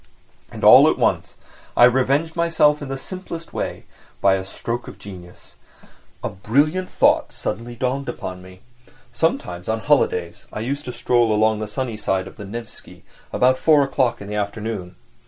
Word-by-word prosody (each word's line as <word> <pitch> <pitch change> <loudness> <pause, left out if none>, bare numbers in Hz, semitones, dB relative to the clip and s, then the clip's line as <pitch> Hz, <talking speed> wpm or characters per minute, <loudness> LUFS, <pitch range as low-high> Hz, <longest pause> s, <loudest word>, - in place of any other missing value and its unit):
And - - -9
all - - +9
at - - 0
once - - 0 0.4
I - - +7
revenged 135 +6 +2
myself 165 -3 +3
in 145 - -5
the 135 0 -4
simplest 170 +1 -8
way, - - -4 0.3
by 100 - +4
a 95 0 -1
stroke 115 +5 -5
of - - -10
genius! 90 -3 -12 0.7
A - - -1
brilliant 145 - 0
thought - - +2
suddenly 120 +4 -5
dawned 130 +2 -2
upon 95 -6 -6
me. 95 0 -14 0.5
Sometimes 90 - -1
on 110 0 -1
holidays 90 - 0
I 105 - -5
used 140 +5 -3
to 125 - -4
stroll 120 -1 +2
along 110 0 +2
the 110 - -4
sunny 115 +1 -4
side 95 -3 -1
of - - -12
the 100 - -8
Nevsky 115 +3 -10 0.3
about 130 +1 +3
four 150 -3 +5
o'clock 130 -4 0
in 100 - -8
the 105 - -6
afternoon. 105 -2 -4
120 Hz, 170 wpm, -21 LUFS, 100-140 Hz, 0.7 s, all